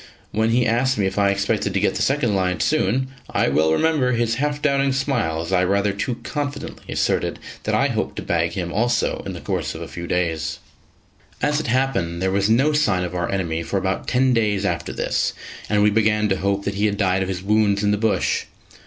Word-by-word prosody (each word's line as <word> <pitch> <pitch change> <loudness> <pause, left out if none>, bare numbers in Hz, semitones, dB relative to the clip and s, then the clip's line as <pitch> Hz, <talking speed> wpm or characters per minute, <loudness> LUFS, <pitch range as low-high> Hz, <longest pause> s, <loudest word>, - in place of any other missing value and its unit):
When 110 +1 +1
he 120 +1 +3
asked 120 +3 +1
me 100 - +1
if 95 +1 -1
I 100 -1 +4
expected 100 0 0
to - - +3
get 105 - +1
the - - -3
second 135 -6 +1
lion 90 -2 0
soon, 130 -4 +1 0.2
I - - +1
well 80 +1 +2
remember 135 - +2
his 115 -1 +1
half 145 0 0
doubting 140 -2 +2
smile 120 - 0
as 85 +3 -4
I 90 -1 +4
rather 100 +2 +1
too 105 +5 -2
confidently 145 -2 -5
asserted - - 0 0.3
that - - +1
I - - +3
hoped - - -2
to - - -5
bag 85 0 0
him 85 -2 -3
also 120 +2 +1
in - - -4
the - - -7
course - - -2
of - - -6
a - - -7
few 85 0 -7
days. 80 -4 -1 0.8
As 145 0 +1
it 155 - -4
happened, 115 -10 0
there 95 +1 0
was 100 +2 +1
no 135 +7 +3
sign 105 -12 +2
of 90 0 -4
our 90 -1 -2
enemy 85 -4 -1
for 85 +4 -2
about 95 0 -2
ten 130 0 +3
days 105 -4 +1
after - - -2
this, - - -1 0.4
and 105 -1 +3
we 105 - +4
began 105 0 +2
to 95 - +1
hope 100 +1 -1
that 100 - -1
he 100 +2 +1
had 105 -1 -2
died 95 -2 +1
of 95 - -2
his 90 -1 -4
wounds 105 0 +2
in 105 - +3
the - - +3
bush. 110 0 0
105 Hz, 225 wpm, -22 LUFS, 95-125 Hz, 0.8 s, I